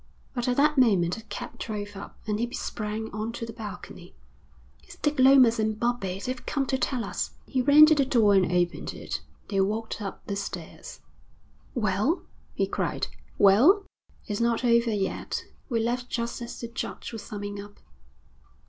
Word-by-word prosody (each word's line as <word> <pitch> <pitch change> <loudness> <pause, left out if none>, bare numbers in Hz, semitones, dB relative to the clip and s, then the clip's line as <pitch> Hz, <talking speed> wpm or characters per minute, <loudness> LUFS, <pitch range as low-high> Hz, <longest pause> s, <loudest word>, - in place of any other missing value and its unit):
But 245 -2 -2
at 245 - +1
that 300 0 +4
moment 190 -8 +3
a - - -12
cab 245 +2 -7
drove 205 -2 -5
up, 195 - -9
and, 210 -1 -1
he 240 +1 -1
sprang 215 0 -4
on 215 +2 -3
to 230 - -4
the 225 - -8
balcony. 220 -3 -9 0.7
'It's - - -13
Dick 295 -2 -1
Lomas 255 -3 +7
and 215 0 0
Bobbie. 205 -6 -1
They've 255 +4 -4
come 275 -2 -1
to 265 - 0
tell 250 -4 0
us.' - - -3
He 260 - 0
ran 290 +4 +9
to 315 - +5
the 290 -2 +3
door 230 -6 +4
and 190 -3 +3
opened 175 -1 0
it. - - -5 0.3
They 195 -1 +2
walked 220 +3 -2
up 195 -2 -6
the 200 - -3
stairs. 200 - -7 0.7
'Well?' 215 - +1 0.3
he - - +2
cried. - - -2 0.3
'Well?' 265 - +6 0.4
'It's 205 +1 -3
not 235 +1 +1
over 235 0 +4
yet. 195 -3 -2 0.3
We 235 -3 +1
left 245 +2 -1
just 235 0 -3
as 235 - -6
the 235 - -4
judge 235 0 -6
was 225 - -5
summing 205 -1 -6
up.' 205 0 -13
230 Hz, 175 wpm, -27 LUFS, 205-250 Hz, 0.7 s, ran